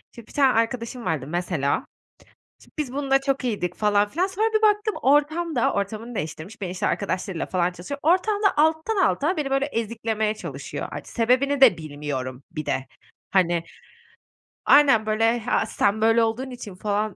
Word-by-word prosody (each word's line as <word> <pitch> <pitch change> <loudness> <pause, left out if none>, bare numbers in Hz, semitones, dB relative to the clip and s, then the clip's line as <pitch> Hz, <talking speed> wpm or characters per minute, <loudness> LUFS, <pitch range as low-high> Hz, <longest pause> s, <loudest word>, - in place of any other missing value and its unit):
Şimdi 235 -2 -12
bir - - -16
tane 270 -3 +4
arkadaşım 230 +1 -1
vardı, 145 -5 -2
mesela. 170 -4 -1 0.8
Şimdi - - -21
biz 285 -5 -2
bununla 270 -1 +1
çok 275 -1 -1
iyiydik 200 -7 -2
falan 205 -1 +2
filan, 340 - 0
sonra 400 +3 0
bir 435 - +2
baktım, 420 0 +3
ortamda 295 +2 +2
-ortamını 215 +4 -3
değiştirmiş, 160 +6 -6
beni, 180 - -3
işte, 185 - -2
arkadaşlarıyla 190 -3 -2
falan 180 -1 0
tanıştırıyor 185 +12 -7
ortamda 395 +4 +2
alttan 320 +7 +2
alta 325 +6 0
beni, 290 -3 -2
böyle, 270 +1 +1
eziklemeye 225 -3 -2
çalışıyor. - - -6
Art - - -7
sebebini 255 +4 +1
de 220 -11 +7
bilmiyorum 145 -4 -5
bir 155 - -5
de. 135 - -1 0.4
Hani 175 -3 +2 1.0
Aynen. 275 -7 +6
Böyle, 225 +2 +2
"Ha, 235 +2 0
sen 205 +2 0
böyle 225 +1 +4
olduğun 240 +4 -2
için." 240 -6 -9
falan. 210 +1 -2
230 Hz, 160 wpm, -24 LUFS, 190-280 Hz, 1.0 s, de